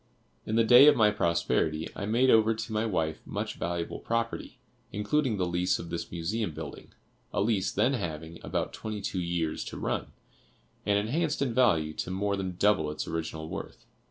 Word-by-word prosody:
In 110 - -1
the 115 - +5
day 125 +5 +8
of 150 - +8
my 105 -2 +5
prosperity 85 -4 0
I 100 - -4
made 125 +4 +4
over 110 0 +5
to 110 0 -5
my 110 +1 +1
wife 80 -6 -1
much - - -4
valuable 85 -1 -3
property, 115 0 -3 0.3
including 110 +4 0
the 90 - +1
lease 90 +1 +1
of 85 - -8
this 85 - -4
Museum 85 +1 -2
building, - - -8 0.4
a - - -1
lease 100 -2 +1
then 135 - +2
having 80 - -4
about - - -2
twenty 110 -1 -5
two 95 -1 -2
years 85 -2 -1
to - - -7
run, - - -2 0.8
and 100 0 +4
enhanced 145 +8 0
in 125 -4 -1
value 80 -11 +3
to 90 - -4
more 100 +2 0
than 95 -2 -4
double 100 -7 +3
its 75 - -4
original 80 -1 -4
worth. - - -7
100 Hz, 185 wpm, -29 LUFS, 85-115 Hz, 0.8 s, day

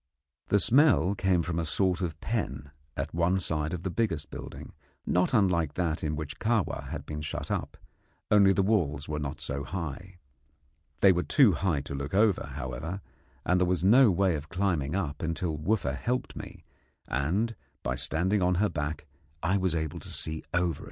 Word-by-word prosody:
The 100 - +3
smell 115 - +4
came 95 -3 +1
from 85 0 -2
a - - 0
sort 90 +3 +1
of 80 -3 -3
pen 70 - -3 0.3
at 70 +3 -3
one 85 +3 +2
side 80 -4 -1
of 90 -1 -4
the 95 - -2
biggest 85 -9 -1
building, - - -8 0.3
not 90 +1 +2
unlike 90 - +2
that 85 -3 -1
in 75 0 -1
which 75 -1 -6
Kahwa 110 -3 0
had - - -5
been 75 0 -5
shut 75 - -4
up, - - -3 0.5
only 100 -2 +6
the 95 0 +2
walls 80 -9 +1
were 75 0 -2
not 70 0 -4
so 70 -2 -4
high. 90 +2 -6 0.8
They 95 - +8
were 90 -1 +1
too 130 +3 +5
high 80 -3 0
to 70 - -7
look 70 +5 -4
over, 105 -1 +3
however, 70 +10 -5 0.4
and 90 +1 +2
there 90 - +3
was 90 -1 0
no 120 +5 +7
way 95 -1 +2
of 75 0 -5
climbing 90 -5 0
up 75 -7 -2
until 80 0 -1
Wooffa 75 -3 0
helped 125 - -2
me, - - -9 0.4
and 95 - 0 0.3
by 60 - 0
standing 90 +10 +1
on 90 0 +3
her 105 +4 +2
back 75 0 -3 0.4
I 90 +3 +2
was 95 -3 0
able 80 -2 -2
to - - -8
see 80 0 -3
over. 85 -1 0
85 Hz, 185 wpm, -29 LUFS, 75-95 Hz, 0.8 s, They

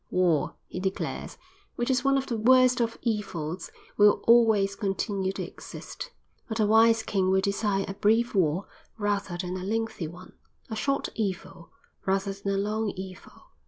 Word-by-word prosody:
"War," 175 -6 +1
he - - -6
declares, 190 +1 -3 0.4
"which 240 +2 0
is 255 -1 +1
one 275 0 +3
of 270 - -1
the 240 - -2
worst 250 +2 +5
of 230 -1 -1
evils, 185 -7 -3 0.3
will 205 0 +5
always 220 -4 +5
continue 195 -1 -1
to - - -4
exist. - - -9 0.4
But 220 0 -3
a 215 - +4
wise 225 +1 +5
king 190 -4 0
will 190 0 +4
desire 200 0 0
a 195 - -4
brief 225 +4 +2
war 180 -1 +1 0.3
rather 205 -4 -1
than 180 +1 -3
a 185 - -6
lengthy 225 -4 -2
one, 180 +3 -12 0.4
a - - -2
short 275 +5 -1
evil 190 -4 -4 0.3
rather 195 +1 0
than 200 0 -2
a - - 0
long 210 +2 -1
evil. 185 -1 -10
200 Hz, 165 wpm, -27 LUFS, 190-225 Hz, 0.4 s, worst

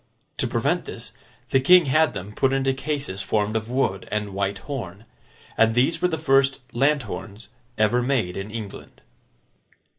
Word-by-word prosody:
To - - +1
prevent - - 0
this, - - -8 0.4
the 135 - +4
King 180 +5 +6
had 155 +4 +3
them 100 +3 -6
put 135 +3 +1
into 135 0 +1
cases 135 -7 -3
formed 105 +1 -1
of 110 +1 -2
wood 120 -7 -1
and 105 -1 -2
white 100 0 -1
horn. 110 -7 -7 0.5
And 115 0 +4
these 130 +7 +2
were 180 - +4
the 160 -3 -2
first 135 -3 +3
lanthorns 120 -5 -1 0.3
ever 110 +3 +3
made 120 -9 0
in 95 +2 -5
England. 110 -2 -8
120 Hz, 155 wpm, -24 LUFS, 105-135 Hz, 0.5 s, King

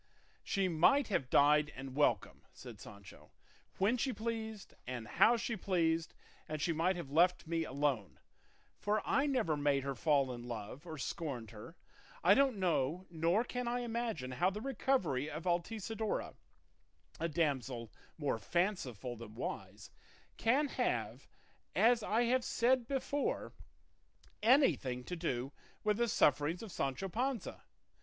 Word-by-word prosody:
"She 195 -1 0
might 185 - +4
have 135 -10 0
died 150 +1 +5
and 130 0 -7
welcome," 145 0 +1
said - - -11
Sancho, 95 -7 -13 0.5
"when 210 +6 +2
she 260 +2 0
pleased 220 -2 -5
and 120 -3 -5
how 235 - +5
she 230 0 -2
pleased; 165 -5 0 0.3
and 155 0 -3
she 165 +3 +1
might 170 +4 +1
have 170 -6 -7
left 175 +3 +3
me 165 0 -1
alone, 135 - -1 0.6
for 210 0 0
I 280 +1 +2
never 240 - +1
made 145 -2 +1
her 140 0 -2
fall 140 0 +2
in 120 0 -8
love 120 +7 -7
or 160 -1 -6
scorned 135 -7 -4
her. 115 +10 -11 0.5
I - - +7
don't 270 -5 +3
know 175 -1 0
nor 170 +6 +2
can 250 0 -4
I 245 +1 0
imagine 230 - -3
how 175 +8 +2
the 200 +2 -5
recovery 215 - 0
of 155 +2 -6
Altisidora, 210 +5 -2 0.9
a 165 - -1
damsel 135 -7 -1 0.3
more 145 -7 -1
fanciful 130 - -1
than 110 -2 -10
wise, 100 -3 -6 0.4
can 270 +6 +2
have, - - -2 0.5
as 235 +1 +5
I 220 +3 +1
have 250 +1 +2
said 245 0 +2
before, 280 +1 -2 0.9
anything 210 - +3
to 180 - -5
do 135 -6 -2 0.3
with 210 -1 +2
the 235 0 +2
sufferings 150 - +2
of 215 - -8
Sancho 135 +7 -2
Panza. 245 +3 -2
170 Hz, 145 wpm, -35 LUFS, 135-225 Hz, 0.9 s, I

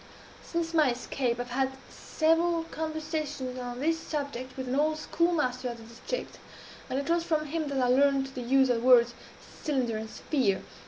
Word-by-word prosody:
Since 335 -1 -2
my 310 -4 +5
escape, 245 0 -1
I - - 0
have 245 - -13
had 265 +1 +1 0.2
several 330 +1 +1
conversations 310 -5 -4
on 245 0 -5
this 325 +3 +1
subject 280 -5 -5
with 260 -1 -4
an 250 - -2
old 305 +3 +2
schoolmaster 295 -6 0
of 235 - -6
the 230 - -12
district; 235 - -6 0.5
and 260 - -1
it 280 0 -2
was 340 0 +2
from 310 -2 0
him 310 +1 -2
that 280 -1 -2
I 255 -1 +3
learned 275 +1 +4
the 255 - -5
use 265 +2 +3
of 245 - +3
the - - -3
words 240 -2 +7 0.5
'cylinder' 255 -7 0
and 220 0 -5
'sphere.' 205 -8 0
270 Hz, 190 wpm, -29 LUFS, 250-315 Hz, 0.5 s, words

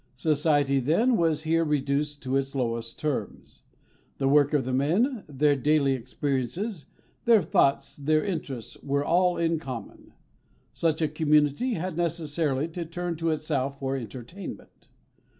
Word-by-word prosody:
Society, 145 -1 +2
then, 195 - +2
was 165 -5 +1
here 165 +1 +2
reduced 145 0 -1
to 130 0 -1
its 135 0 -1
lowest 115 -3 -2
terms. 150 -3 -4 0.6
The 135 - 0
work 145 0 +4
of 145 -5 +1
the 130 - -2
men, 195 - +1
their 145 +1 +2
daily 140 0 +2
experiences, 140 - -3 0.4
their 225 -5 +5
thoughts, 140 -3 +1
their 155 +2 +1
interests, 150 - -5
were 140 +1 -1
all 180 +2 +3
in 165 -1 +1
common. 125 -8 -8 0.6
Such 160 -1 0
a - - +3
community 150 - +2
had 180 0 -4
necessarily 160 -4 0
to 170 +1 -5
turn 175 +1 -4
to 165 +1 -1
itself 140 -3 -1
for 135 0 -2
entertainment. 130 - -8
150 Hz, 140 wpm, -27 LUFS, 135-165 Hz, 0.6 s, their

